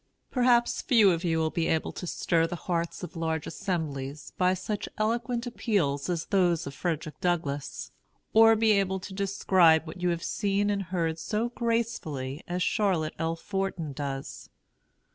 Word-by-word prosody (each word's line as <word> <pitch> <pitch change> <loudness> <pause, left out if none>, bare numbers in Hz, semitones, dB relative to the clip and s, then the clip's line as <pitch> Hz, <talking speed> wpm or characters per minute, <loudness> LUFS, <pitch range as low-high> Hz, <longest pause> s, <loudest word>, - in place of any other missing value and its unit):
Perhaps 245 -2 +3
few 225 -8 +5
of 170 0 -1
you 165 -2 +1
will 160 -1 +1
be 165 -1 0
able 160 - 0
to 180 - -7
stir 165 -1 +1
the 175 - -4
hearts 170 -1 -2
of 180 - -7
large 160 -2 -2
assemblies 145 -7 -4
by 185 0 +2
such 200 +3 -4
eloquent 235 +3 -1
appeals 200 - 0
as 170 -2 -1
those 180 -4 +2
of 140 - -6
Frederick 160 0 -3
Douglass, 160 -6 -2 0.4
or 225 0 +7
be 220 0 +3
able 195 -2 +2
to 190 +1 -8
describe 185 -4 +3
what 165 +2 -9
you 180 - +2
have 170 -1 -2
seen 205 0 0
and 200 -1 0
heard 165 -3 -1
so 220 +6 -1
gracefully 220 - -2
as 180 +1 -1
Charlotte 185 -8 +1
L. 165 0 0
Forten 185 -4 -3
does. 135 -1 -5
180 Hz, 160 wpm, -28 LUFS, 160-205 Hz, 0.4 s, or